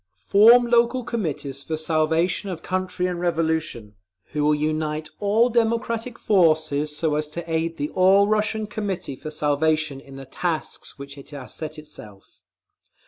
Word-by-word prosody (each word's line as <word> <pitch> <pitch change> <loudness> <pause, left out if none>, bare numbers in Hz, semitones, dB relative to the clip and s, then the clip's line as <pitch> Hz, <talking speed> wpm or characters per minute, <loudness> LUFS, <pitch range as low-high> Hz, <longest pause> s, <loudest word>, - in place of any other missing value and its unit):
Form 230 +4 +7
local 240 +1 +2
Committees 155 - -4
for 155 +2 -4
Salvation 160 +4 0
of 175 -3 -6
Country 185 -1 -2
and 180 -1 -2
Revolution, 160 -10 -1 0.4
who 150 0 -1
will 150 0 +3
unite 155 0 -2
all 215 +4 +3
democratic 230 0 -1
forces, 155 -6 +2
so 160 -2 0
as 150 0 -1
to 165 +3 -7
aid 165 0 -1
the 145 +1 -3
All 190 +2 +5
Russian 215 0 0
Committee 205 -9 -4
for 155 - -8
Salvation 155 -1 0
in 135 0 -13
the 135 0 -9
tasks 165 +3 -4
which 140 0 -10
it 140 - -13
has 140 -4 -8
set 155 0 -6
itself…. 110 -10 -13
160 Hz, 150 wpm, -23 LUFS, 150-200 Hz, 0.4 s, Form